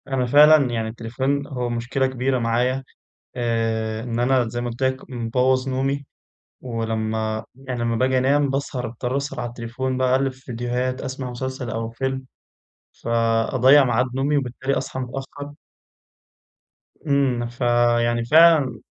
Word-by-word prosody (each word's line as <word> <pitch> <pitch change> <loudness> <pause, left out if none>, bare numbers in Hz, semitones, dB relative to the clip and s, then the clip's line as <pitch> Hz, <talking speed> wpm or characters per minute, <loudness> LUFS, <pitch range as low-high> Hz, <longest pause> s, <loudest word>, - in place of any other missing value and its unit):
أنا 135 -2 0
فعلًا 150 +3 +7
يعني 115 -1 -2
التليفون 130 +5 -2
هو 125 -3 -3
مشكلة 120 +3 -1
كبيرة 130 0 -1
معايا، 125 +3 0 0.5
آآ 115 -2 -1
إن 120 -1 -3
أنا 125 -1 +2
زي 120 +2 -4
ما 120 - -2
قلت 120 +3 -5
لك، 130 0 -1
مبوظ 125 +2 0
نومي 135 +2 -1 0.6
ولمّا 110 -2 -2
يعني 130 -2 -6
لمّا 115 -1 0
باجي 130 +2 +2
أنام 140 +2 +2
باسهر 135 -2 -2
باضطر 125 +3 -3
أسهر 140 0 -3
على 120 - -3
التليفون 120 +2 -4
باقلِّب 130 +1 +2
في 130 - -20
فيديوهات 125 +1 -3
أسمع 130 -1 -5
مسلسل 130 0 -5
أو 115 0 -3
فيلم 130 +2 -3 0.8
فأضيع 115 +4 +4
ميعاد 125 +1 +2
نومي 140 +2 +1
وبالتالي 130 0 -2
أصحى 130 - -4
متأخّر. 135 +3 -7 1.5
إمم، 135 -4 +1
فيعني 120 -1 +1
فعلًا 155 -1 +5
125 Hz, 135 wpm, -22 LUFS, 120-135 Hz, 1.5 s, فعلًا